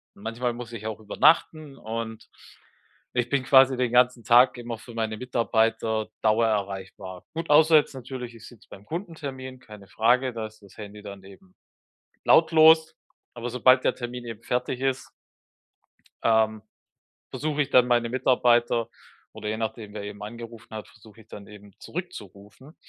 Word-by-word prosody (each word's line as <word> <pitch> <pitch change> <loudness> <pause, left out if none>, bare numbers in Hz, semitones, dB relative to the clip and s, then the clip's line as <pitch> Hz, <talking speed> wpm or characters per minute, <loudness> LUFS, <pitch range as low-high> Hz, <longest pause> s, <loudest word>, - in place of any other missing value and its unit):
Manchmal 115 +3 -3
muss 120 0 -9
ich 110 -1 -6
auch 110 -1 -5
übernachten 150 +5 +1
und 110 -1 -6 0.9
ich 125 -1 -1
bin 140 -1 0
quasi 130 0 +5
den 125 -2 0
ganzen 125 -1 +3
Tag 125 +3 +5
immer 120 -1 -6
für 120 - -13
meine 110 -1 -2
Mitarbeiter 115 -3 0 0.2
dauererreichbar. 100 -4 -1
Gut, 165 -1 -4
außer 160 +2 +6
jetzt 150 - +1
natürlich, 125 -1 -7
ich 110 - -13
sitze 120 -4 -17
beim 100 +1 -13
Kundentermin, 145 -7 -7
keine 105 -5 -14
Frage, 125 +6 +1
da 115 -1 -4
ist 110 0 -20
das 100 - -18
Handy 105 0 -10
dann 100 -1 -10
eben 95 -1 -17 0.7
lautlos. 160 -1 +5 0.4
Aber 120 +1 -5
sobald 130 +1 +4
der - - +1
Termin 120 0 -7
eben 115 -1 -8
fertig 125 0 -2
ist 130 -1 -2 1.1
ähm, 110 -1 +2 0.7
versuche 150 0 -1
ich 140 - -6
dann 125 -2 +5
meine 120 -1 +2
Mitarbeiter 120 -2 +2 0.4
oder 105 - -7
je 110 - -2
nachdem, 110 -1 -5
wer 105 - -5
eben 105 0 -8
angerufen 115 +1 -10
hat, 110 - -7
versuche 110 +1 -18
ich 110 - -30
dann 100 -2 -11
eben 105 -1 -14
zurückzurufen. 130 - -9
115 Hz, 155 wpm, -25 LUFS, 110-130 Hz, 1.1 s, außer